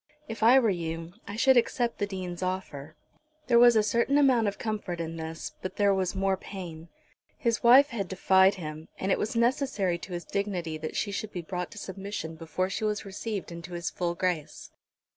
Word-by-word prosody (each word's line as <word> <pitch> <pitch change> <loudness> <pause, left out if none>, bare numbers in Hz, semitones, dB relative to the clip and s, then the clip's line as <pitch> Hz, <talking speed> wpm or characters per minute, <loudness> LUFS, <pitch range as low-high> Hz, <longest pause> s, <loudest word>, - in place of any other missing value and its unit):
If 225 - -7
I 235 +4 +7
were 230 -5 +4
you 165 -1 -4
I 200 - -5
should 260 +3 +5
accept 240 0 +1
the 205 - 0
Dean's 185 -3 -5
offer." 170 -6 -4 0.5
There 235 -2 +5
was 240 -1 +7
a 215 - +4
certain 235 +6 +2
amount 255 -6 +4
of 200 - -2
comfort 210 -6 -3
in 165 0 -4
this, 160 0 -6
but 185 - -5
there 200 -1 +3
was 190 -1 -1
more 195 0 +1
pain. 175 -4 -9 0.5
His 235 -2 0
wife 260 +4 +7
had 205 -6 -3
defied 190 +1 +4
him, 155 -3 -7
and 190 - -1
it - - +2
was 215 - -2
necessary 235 -7 +1
to 180 - -8
his 175 0 -5
dignity 185 -5 -2
that 155 0 -5
she 205 - -1
should 210 +1 -4
be 175 - -5
brought 180 +1 -4
to - - -13
submission 195 -4 -5
before 165 +3 -2
she 195 - -4
was 210 -1 -1
received 200 -1 -5
into 170 +1 -8
his 170 0 -3
full 175 -1 -2
grace. 175 -5 -3
190 Hz, 200 wpm, -28 LUFS, 175-220 Hz, 0.5 s, I